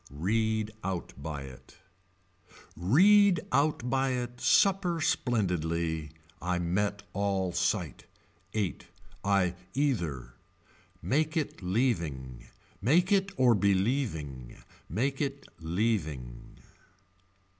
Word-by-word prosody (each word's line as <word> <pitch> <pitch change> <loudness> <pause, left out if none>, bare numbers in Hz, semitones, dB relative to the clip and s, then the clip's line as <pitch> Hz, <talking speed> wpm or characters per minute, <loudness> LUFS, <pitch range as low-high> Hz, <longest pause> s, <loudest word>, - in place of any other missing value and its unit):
Read 110 +8 0
out 90 -2 -3
by 75 -2 -5
it. 65 -2 -13 1.0
Read 185 - +5
out 145 -4 +1
by 135 +2 +1
it 120 -1 -4
supper 190 -4 +3
splendidly. 85 - 0 0.3
I 90 0 0
met 100 +4 -1
all 95 -2 0
sight. - - -1 0.5
Eight. 100 -5 -2 0.4
I 100 -3 +2 0.2
either. 85 - -1 0.7
Make 155 +4 +1
it 150 -8 -2
leaving. 85 - -1 0.3
Make 175 - +3
it 195 0 +3
or 125 -2 +5
believing. 95 - 0 0.3
Make 135 - -1
it 140 -1 -3
leaving. 80 - -2
100 Hz, 90 wpm, -29 LUFS, 85-135 Hz, 1.0 s, Read